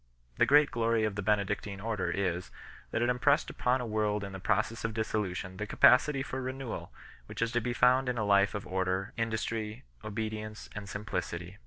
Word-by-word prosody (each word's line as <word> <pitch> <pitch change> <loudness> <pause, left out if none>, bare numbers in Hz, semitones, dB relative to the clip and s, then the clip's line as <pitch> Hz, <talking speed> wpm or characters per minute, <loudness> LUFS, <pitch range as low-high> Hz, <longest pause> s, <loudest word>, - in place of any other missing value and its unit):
The - - +5
great 145 +1 +6
glory 115 -1 +1
of 110 -2 0
the 105 - -3
Benedictine 100 0 0
Order 100 -4 -2
is, 90 -1 -1 0.4
that 110 - 0
it 120 - +2
impressed 135 +4 +2
upon 125 +1 +1
a - - -3
world 105 -2 0
in 100 - -6
the 95 - -7
process 110 +4 0
of 115 -1 -2
dissolution 95 -4 -2
the 105 - -4
capacity 130 +6 +5
for 130 -1 -4
renewal 130 -1 -5 0.4
which - - -8
is 115 0 +1
to 120 -1 +1
be 125 - -2
found 125 +2 +4
in 125 - -1
a 110 - 0
life 100 0 +4
of 105 - -4
order, 95 +2 -1
industry, 110 -1 -2 0.2
obedience 110 0 -5
and 105 -2 -7
simplicity. 90 -2 -4
110 Hz, 190 wpm, -31 LUFS, 100-120 Hz, 0.4 s, great